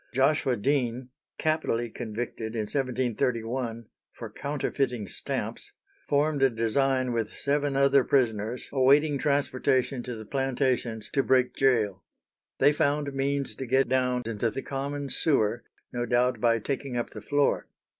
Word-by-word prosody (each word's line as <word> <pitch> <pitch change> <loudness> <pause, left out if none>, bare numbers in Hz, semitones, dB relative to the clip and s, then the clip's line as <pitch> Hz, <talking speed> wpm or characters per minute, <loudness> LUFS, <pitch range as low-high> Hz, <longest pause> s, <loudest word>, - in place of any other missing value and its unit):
Joshua 135 -1 +2
Dean, 125 +1 0 0.3
capitally 155 -7 0
convicted 115 0 -5
in 110 - 0
1731 120 -1 -1 0.3
for 115 -3 -9
counterfeiting 135 -4 -2
stamps, - - -5 0.4
formed 145 0 +2
a 135 - +6
design 130 +3 +1
with 115 -2 -1
seven 140 -1 0
other 140 -1 +5
prisoners 115 -3 0
awaiting 140 +2 +4
transportation 135 -2 +1
to 125 0 -5
the 110 -1 -8
plantations 130 -4 -1
to 135 - +3
break 130 -2 +2
gaol. 110 -8 +2 0.6
They 145 +2 +5
found 145 -1 0
means 135 -2 -1
to 130 +4 -6
get 130 +2 +3
down 125 -1 +1
into 115 0 -1
the 135 +5 -5
common 140 +1 -4
sewer, 120 -8 +1 0.3
no 120 0 -2
doubt 125 +1 +2
by 115 -1 +4
taking 135 +2 -3
up 120 - -2
the 110 - -8
floor. 145 +6 +1
130 Hz, 135 wpm, -27 LUFS, 115-140 Hz, 0.6 s, a